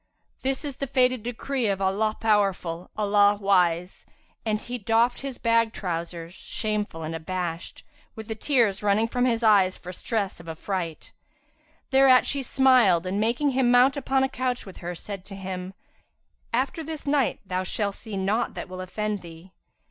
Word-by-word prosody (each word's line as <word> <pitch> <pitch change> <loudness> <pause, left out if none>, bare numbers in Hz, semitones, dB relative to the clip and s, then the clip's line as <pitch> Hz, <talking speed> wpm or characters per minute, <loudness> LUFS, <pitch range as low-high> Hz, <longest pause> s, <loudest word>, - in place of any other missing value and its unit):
This 265 +3 -1
is 280 -2 -5
the 275 - -3
fated 255 -2 +2
decree 245 +2 -2
of 200 -1 +1
the 195 - -3
All 215 +3 +1
powerful, 195 -6 0
the 215 - 0
All 205 0 +4
wise!"; 180 -3 +1 0.4
and 215 -1 0
he 245 +2 -6
doffed 230 +3 +2
his 275 -2 -6
bag 230 -1 +2
trousers, 170 -2 -4
shamefull 210 -5 -3
and 155 +1 -4
abashed, 170 +1 -4 0.3
with 220 -2 -8
the 220 - -2
tears 220 -4 +1
running 210 +2 +2
from 245 +1 0
his 235 -2 +1
eyes 200 -4 +4
for 180 0 -9
stress 200 -1 -2
of 165 -1 -10
affright. 165 0 -4 0.8
Thereat 265 -1 +6
she 280 - -1
smiled 250 -10 +4
and 190 +2 -1
making 240 +7 +1
him 260 -1 +2
mount 250 +3 +5
upon 270 -1 +1
a - - +3
couch 255 -2 -2
with 190 - -11
her, 175 0 -5
said 195 +2 -7
to 195 - -8
him, 185 -1 -6 0.8
"After 265 +7 -1
this 315 -1 -6
night, 280 -2 +1
thou 185 -1 -1
shalt 200 +2 -1
see 215 -1 -7
naught 200 +5 0
that - - -5
will 185 0 -7
offend 210 +2 -3
thee." 170 +2 -12
210 Hz, 175 wpm, -26 LUFS, 185-245 Hz, 0.8 s, Thereat